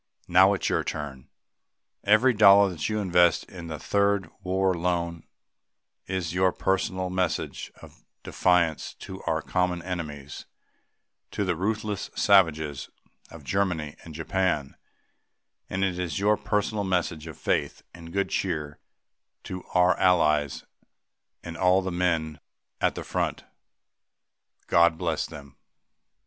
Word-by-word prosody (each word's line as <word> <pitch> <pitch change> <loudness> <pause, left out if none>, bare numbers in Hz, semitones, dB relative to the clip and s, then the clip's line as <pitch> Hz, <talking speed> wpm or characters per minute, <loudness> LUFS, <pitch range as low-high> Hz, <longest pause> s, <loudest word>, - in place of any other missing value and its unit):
Now 95 +3 +5
it - - -7
is - - +1
your - - +1
turn! 70 -4 -6 0.7
Every 110 +5 +4
dollar 100 -2 +7
that 80 0 -3
you 110 - -1
invest 90 -4 +3
in 85 -2 -10
the 80 -1 -5
Third 100 +1 0
War 95 +1 +1
Loan 85 -1 -2 0.8
is 90 -3 -3
your 90 0 +3
personal 95 -1 -1
message 90 -1 -2
of - - -15 0.2
defiance 85 -3 +1
to - - -9
our - - 0
common 90 -2 -1
enemies 75 -6 -6 0.8
to 100 - -2
the 90 -2 0
ruthless 105 +2 -2
savages 80 -8 +2 0.4
of - - -12
Germany 90 -7 -1
and 80 -2 -11
Japan 80 -4 -1 0.9
and 95 +1 -1
it 90 -2 -1
is 90 -2 -3
your 105 +2 +3
personal 105 0 -1
message 85 -4 -1
of 80 - -9
faith - - -1
and 85 -1 -11
good 100 +2 -1
cheer 75 -6 -2 0.6
to 90 -1 -6
our 90 0 +5
Allies 75 -6 +2 0.8
and 85 0 -7
to - - -9
all 90 +1 +4
the 95 - -3
men 85 -4 -1 0.4
at - - +1
the - - -5
front. - - -2 1.2
God 85 -1 +4
bless - - -1
them! 70 -2 -12
90 Hz, 130 wpm, -26 LUFS, 80-95 Hz, 1.2 s, dollar